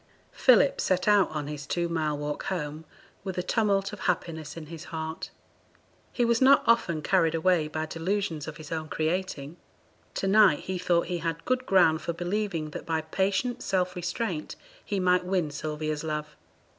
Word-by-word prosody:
Philip - - +4
set 185 +1 +1
out 205 -2 +5
on 150 -2 -4
his 145 -1 -6
two 170 +2 0
mile 155 -3 -1
walk 145 0 -4
home 160 -4 -4 0.4
with 190 -2 -5
a 180 - 0
tumult 200 -1 +1
of - - -7
happiness 165 -3 -3
in 160 - -7
his 165 +1 -9
heart. 160 0 -5 0.8
He 240 - +1
was 235 +1 +2
not 270 +1 +6
often 170 -9 +2
carried 165 -3 +3
away 165 -1 +2
by 155 +1 -3
delusions 165 -1 -2
of 155 -2 -7
his 155 0 -11
own 160 -1 -3
creating; 160 -2 -2 0.6
to - - -2
night 195 -5 +5
he 185 -1 -4
thought 175 -1 +2
he 175 -1 -3
had 165 0 -3
good 255 0 0
ground 165 -5 +4
for 170 - -3
believing 175 -2 -2
that - - -6
by 160 -1 0
patient 195 +9 -1
self 185 -1 0
restraint 180 -1 -3 0.3
he 200 - -2
might 180 0 +3
win 180 -4 0
Sylvia's 155 0 -3
love. 150 -1 -4
170 Hz, 175 wpm, -27 LUFS, 155-190 Hz, 0.8 s, not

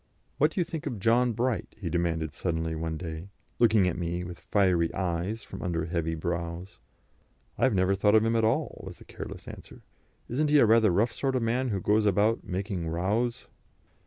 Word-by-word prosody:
"What 150 - +5
do 175 - -4
you - - +4
think 160 -2 -6
of 120 - -3
John 120 +4 +3
Bright?" 120 +1 -2
he 95 - -5
demanded 85 -2 -1
suddenly 80 0 -2
one 80 0 -3
day, 80 +1 -6 0.3
looking 110 -5 +5
at 90 0 -2
me 85 +1 -2
with 90 -1 -8
fiery 90 -5 +2
eyes 95 +4 -2
from - - -9
under 85 -2 -1
heavy 80 -1 -2
brows. 85 +2 -4 0.8
"I 120 - +2
have 130 -6 +2
never 95 +1 +3
thought 105 +2 +3
of 110 0 +5
him 115 0 +1
at 115 - +2
all," 110 - 0
was - - -9
the - - -15
careless - - -9
answer. - - -11 0.4
"Isn't 150 +5 0
he 150 - +5
a 140 - +6
rather 110 -1 +5
rough 105 +7 +2
sort 135 -1 -1
of 125 - +1
man, 125 +3 0
who 100 -3 -1
goes 105 +3 +2
about 105 +4 +2
making 95 -2 -3
rows?" 105 +9 -1
95 Hz, 200 wpm, -28 LUFS, 85-115 Hz, 0.8 s, a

